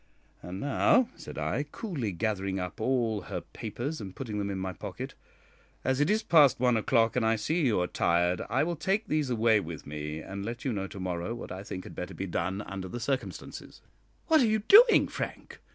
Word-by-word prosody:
And 90 +2 -6
now," 145 - +3
said 155 - -10
I, - - -1
coolly, 145 - -4
gathering 95 0 -1
up 90 +5 -5
all 115 -4 +1
her - - -2
papers 120 +7 -5
and 95 -2 -8
putting 110 -6 -4
them 100 -1 -2
in 100 - -3
my 95 0 -3
pocket, - - -7 0.7
"as 130 0 +1
it 145 - +3
is 215 +1 +2
past 150 -7 +5
one 125 -1 +3
o'clock, 115 +1 +2
and 125 - +2
I 110 0 +3
see 155 +8 0
you 110 -6 +2
are - - +1
tired, 90 +1 +1
I 130 +6 +2
will 170 +2 -1
take 190 +7 0
these 150 -3 0
away 115 -2 +3
with 80 -5 -7
me, 75 +1 -5
and 100 +4 -6
let 115 +5 -5
you 130 - 0
know 95 -2 -3
to 95 - -9
morrow 90 +4 -3
what 120 - -8
I 95 - -5
think 95 -2 -6
had - - -10
better 90 0 -6
be 95 - -3
done 95 +2 -2
under 95 -2 -6
the 120 +7 -5
circumstances." 135 +2 -4 0.4
"What 320 -3 +5
are 240 - +4
you 215 -1 +1
doing, 455 +3 +8
Frank? - - -6
110 Hz, 215 wpm, -29 LUFS, 95-140 Hz, 0.7 s, doing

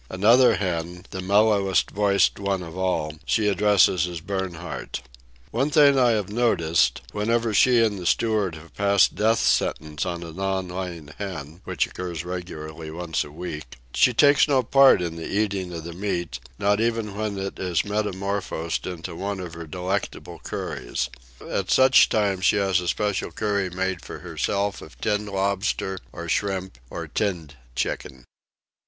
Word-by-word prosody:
Another 115 +5 +5
hen—the 90 0 -4
mellowest 100 -1 +3
voiced 100 -1 +2
one 100 -2 -1
of 80 0 -9
all—she 95 +2 -1
addresses 100 -4 +4
as 85 -2 -5
Bernhardt. 90 -5 -5 0.5
One 135 +6 +1
thing 145 -2 +5
I 125 -1 +5
have 105 -4 -1
noted: 85 -9 +1 0.3
whenever 115 +2 0
she 120 +2 +5
and 105 -3 -2
the 90 - -3
steward 105 -7 +1
have 80 0 -13
passed 100 -1 +3
death 110 +2 +2
sentence 75 -1 0
on 85 -2 -3
a 85 - -8
non 95 +1 -2
laying 90 -4 -6
hen 85 -4 -6
(which 90 -5 0
occurs 85 -2 -6
regularly 80 -3 -6
once 80 0 -2
a - - -11
week), 75 -5 -7 0.2
she 125 - +5
takes 145 +5 +5
no 135 -3 +3
part 135 -5 +6
in 85 -1 -4
the 80 - -5
eating 100 -3 -1
of 85 -2 -6
the 85 +1 -7
meat, 85 -7 -3 0.2
not 105 +2 +2
even 115 -3 -1
when 105 -1 -2
it 95 0 -5
is 90 -3 0
metamorphosed 100 -5 -2
into 90 -1 -6
one 100 +2 -3
of 90 -3 -6
her 85 -1 -8
delectable 90 +5 -4
curries. - - -4 0.4
At 95 -2 -2
such 130 0 +6
times 100 -3 +1
she - - +5
has 95 -2 +2
a 90 - -5
special 105 +1 -1
curry 100 -3 -1
made 95 0 -2
for - - -7
herself 100 0 -2
of - - -13
tinned 105 -1 -1
lobster, 95 -1 -1
or 85 0 -7
shrimp, 95 -6 -2
or - - -6
tinned 85 -8 -2 0.2
chicken. 65 0 -3
95 Hz, 160 wpm, -24 LUFS, 85-105 Hz, 0.5 s, part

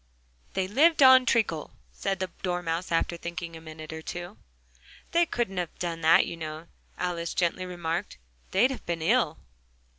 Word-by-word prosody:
"They 190 -1 0
lived 295 - +4
on 260 -1 +8
treacle," 190 -11 +1 0.2
said 195 -1 -2
the 185 -2 -3
Dormouse, 175 -1 -2
after 170 +1 +1
thinking 170 0 -6
a 160 - -10
minute 155 0 -9
or 160 - -6
two. 175 +4 -7 0.7
"They 340 0 +3
couldn't 230 -9 -2
have 175 -2 -3
done 170 -2 -3
that, 160 +1 +6
you - - -5
know," 155 0 -6 0.3
Alice 170 -2 -2
gently 180 +1 0
remarked: 175 +1 -3 0.3
"they'd 245 +8 +3
have 265 - -6
been 170 -2 -2
ill." 190 -4 +2
175 Hz, 160 wpm, -27 LUFS, 165-195 Hz, 0.7 s, on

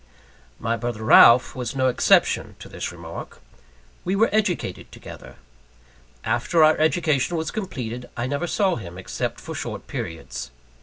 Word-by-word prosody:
My 115 +1 -1
brother 115 -1 -4
Ralph 120 +2 +7
was 125 +1 -4
no 130 -1 +1
exception 125 - +2
to - - -11
this - - -5
remark. - - -9 0.6
We 185 - -1
were 220 +3 +3
educated 205 - -1
together. - - -11 0.9
After 120 +9 +2
our 155 0 +6
education 160 -1 +1
was 160 0 -3
completed, 125 - -5
I 120 - -1
never 145 +6 -2
saw 190 0 +1
him, 90 -5 -9
except 95 - -4
for - - -8
short - - -6
periods. 80 -5 -6
130 Hz, 145 wpm, -23 LUFS, 115-175 Hz, 0.9 s, Ralph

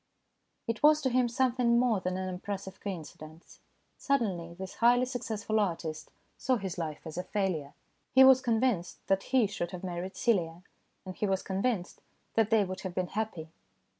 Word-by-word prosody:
It 230 -1 -3
was 300 0 +6
to 260 - +1
him 250 -1 +3
something 245 -1 +2
more 240 -4 +3
than 185 0 -2
an 185 -1 -3
impres 200 0 -4
sive 190 -1 -10
coincidence. 160 -4 -8 0.4
Suddenly 190 - -1
this 190 +1 -8
highly 245 +2 +5
successful 220 -4 -2
artist 165 -5 -2 0.3
saw 255 0 +2
his 190 -5 -4
life 155 -1 -5
as 160 +2 -5
a - - -2
failure. 185 -8 -2 0.4
He 265 - +7
was 265 -1 +8
convinced 230 -7 0
that 195 0 +1
he 255 -4 +4
should 195 -4 -3
have 180 0 -8
married 185 +1 -5
Celia, 175 -7 0 0.4
and 185 -1 -7
he 210 - -1
was 190 -1 0
convinced 195 -1 -2 0.3
that 225 -2 +2
they 220 -2 +4
would 185 0 -5
have 185 -2 -6
been 185 -1 -1
happy. 200 -7 -4
195 Hz, 175 wpm, -30 LUFS, 180-235 Hz, 0.4 s, was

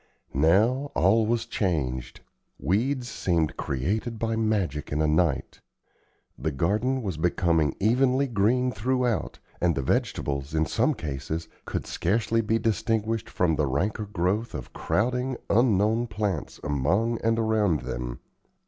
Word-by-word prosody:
Now 110 - +3
all 105 +5 +4
was 115 0 0
changed. 70 - -2 0.4
Weeds 120 - 0
seemed 85 -9 0
created 105 - -2
by 115 0 -1
magic 105 -10 -1
in 75 - 0
a 80 - +3
night. 75 -1 +1 0.8
The 80 - -1
garden 105 - 0
was 95 -7 -3
becoming 80 -3 +1
evenly 130 +6 +3
green 120 +3 +2
throughout; 125 +2 -1 0.2
and 85 -2 +2
the 70 - -1
vegetables, 70 +3 -1
in 80 0 +2
some 125 - +1
cases, 80 - -4 0.2
could - - -3
scarcely 110 +5 0
be 110 +1 +1
distinguished 110 +1 0
from 85 -3 +1
the 75 - +1
ranker 100 +10 -1
growth 100 +4 -1
of 65 - -7
crowding, 125 +3 0
unknown 110 +1 +3
plants 100 -6 -3
among 90 - +1
and 115 0 +2
around 110 - +2
them. - - -5
105 Hz, 130 wpm, -26 LUFS, 80-115 Hz, 0.8 s, all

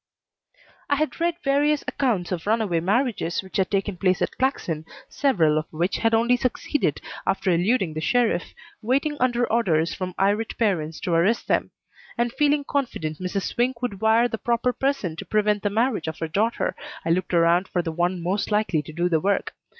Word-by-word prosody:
I 285 - +3
had 310 +3 -2
read 340 0 +1
various 290 +1 +2
accounts 215 -11 0
of 180 0 -3
runaway 215 -6 +1
marriages 200 -1 0
which 190 +2 -6
had 190 -2 +1
taken 195 -1 -1
place 185 0 +2
at - - -3
Claxon, 175 - -1 0.3
several 165 - +2
of 155 - -6
which 170 +4 -1
had 225 0 +2
only 240 +2 +3
succeeded 255 +3 -1 0.3
after 195 -1 +1
eluding 180 0 +1
the 155 - -4
sheriff, 235 -1 +1 0.3
waiting 275 +6 +1
under 245 -1 +2
orders 170 -8 +1
from 185 -2 -5
irate 205 +3 +1
parents 165 -8 0
to 175 - -1
arrest 185 +8 +2
them; - - +1 0.5
and 240 0 0
feeling 295 -1 +2
confident 235 - -3
Mrs. 185 +1 -2
Swink 245 0 -1
would 200 -6 -3
wire 225 +2 +4
the 225 -2 -5
proper 240 +1 0
person 270 - -1
to - - -5
prevent 210 -1 +1
the 205 - 0
marriage 220 -4 0
of 160 - -4
her 165 - -3
daughter, 210 +9 0 0.3
I 165 - +1
looked 180 +1 0
around 170 +2 +3
for 175 - -1
the 165 - -3
one 175 +1 -1
most 190 +4 -1
likely 210 -7 +1
to 155 - -10
do 170 +3 0
the 165 -3 +2
work. 200 +5 0
205 Hz, 190 wpm, -24 LUFS, 175-245 Hz, 0.5 s, wire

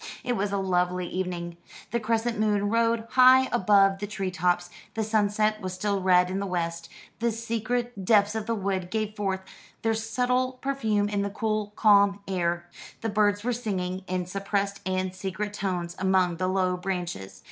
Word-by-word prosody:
It 245 - 0
was 200 -1 -1
a 200 - 0
lovely 180 -1 0
evening. 175 -2 -4 0.3
The 235 - +1
crescent 230 +1 -1
moon 205 -1 +1
rode 230 0 +2
high 260 +1 +7
above 195 0 +4
the 205 - -4
tree 195 -2 -3
tops; 175 0 0 0.2
the 220 - 0
sunset 215 0 +1
was 185 -1 -4
still 200 +1 -1
red 180 -1 +4
in 190 - -1
the 200 - -2
west. 170 -2 -3 0.3
The 235 +1 +1
secret 230 0 -3
depths 205 +1 +4
of 220 -1 -4
the 230 - 0
wood 190 -3 -2
gave 215 0 -2
forth 195 -2 -1 0.4
their 225 0 +2
subtle 250 +3 0
perfume 225 -6 0
in 205 -1 -1
the 200 - -1
cool, 215 0 -2
calm 200 -2 +5
air. 175 -2 -1 0.3
The 225 - -1
birds 205 -1 +2
were 245 +1 0
singing 190 -6 -3
in 185 -1 -2
suppressed 200 +2 -2
and 185 0 -1
secret 195 +2 -4
tones 180 -4 -3
among 185 -2 +2
the 185 +2 0
low 185 -1 +1
branches. 180 - -4
200 Hz, 175 wpm, -27 LUFS, 185-220 Hz, 0.4 s, high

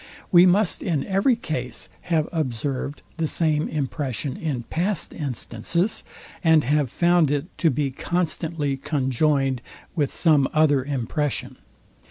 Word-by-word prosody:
We 180 -1 +8
must 195 +1 +3
in 160 -7 -1
every 200 +6 +2
case 130 - -5 0.2
have 160 -2 +2
observed 140 -2 -3
the 165 -1 0
same 155 -1 +1
impression 140 -2 -3
in 140 -7 -3
past 180 - -1
instances, 145 - -2 0.4
and 160 -2 +5
have 145 0 +1
found 170 +2 +3
it 145 +4 -2
to 165 - +4
be 140 0 -1
constantly 160 -2 -1
conjoined 135 -1 0 0.3
with 145 -5 0
some 150 -5 +3
other 150 -4 +3
impression. 140 +2 -2
150 Hz, 125 wpm, -24 LUFS, 135-165 Hz, 0.4 s, We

